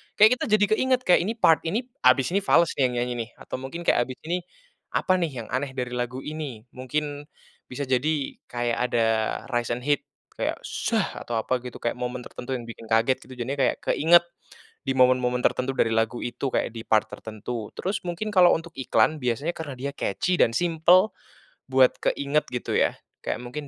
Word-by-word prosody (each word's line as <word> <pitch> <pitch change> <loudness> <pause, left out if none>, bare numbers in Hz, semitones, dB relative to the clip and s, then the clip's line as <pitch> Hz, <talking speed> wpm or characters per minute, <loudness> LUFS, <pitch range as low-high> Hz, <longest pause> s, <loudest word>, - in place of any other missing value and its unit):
Kayak 220 +4 +6
kita - - -1
jadi 210 -1 +4
keinget, 255 +1 +2
“Kayak 180 - +5
ini 220 - 0
part 165 -8 +5
ini 220 +9 0 0.2
habis 130 +4 +5
ini 200 - +2
fales 170 -4 +3
nih 130 - +5
yang 125 - -5
nyanyi 125 - -3
nih,” - - -20
atau - - -7
mungkin 135 +6 -6
kayak, 120 - +2
"Habis 130 - -6
ini, 175 +2 0 0.6
apa 185 - +2
nih 165 -4 -1
yang - - -13
aneh 135 +1 -1
dari 125 -1 -3
lagu 125 +1 -3
ini?” 150 -8 -6
Mungkin 145 +3 -4 0.4
bisa 140 +3 -3
jadi 140 +3 0 0.2
kayak 120 -1 -1
ada 115 -1 +3 0.4
rise 120 -1 0
and 125 - -8
hit 145 -1 +1 0.3
kayak - - -1
“shh” - - -2 0.2
atau 120 - -5
apa 125 +3 -1
gitu, 125 -2 -7
kayak 120 - 0
momen 125 0 -4
tertentu 130 +1 -5
yang 120 - -8
bikin 115 -1 -10
kaget 115 +4 +3
gitu. 130 - -10
Jadinya 135 +3 -4
kayak 130 - +2
keinget 170 +2 +5 0.6
di 135 - 0
momen-momen 125 -1 +3
tertentu 130 +1 +1
dari 115 - +2
lagu 115 +1 0
itu, 120 +3 -3
kayak - - 0
di 115 - -6
part 110 0 +3
tertentu. 110 +1 -6
Terus 195 +2 -3
mungkin 175 +5 -3
kalau 180 -3 +6
untuk 165 +1 -6
iklan 135 +3 +2
biasanya 130 +6 -1
karena 150 -4 -6
dia 140 +2 -3
catchy 180 - 0
dan 115 - +5
simpel, 175 +4 +4 0.6
buat 130 -1 +5
keinget 140 +2 +1
gitu 125 - -3
ya. - - +3 0.3
Kayak - - -2
mungkin, 145 +4 -6
135 Hz, 195 wpm, -25 LUFS, 125-165 Hz, 0.6 s, Kayak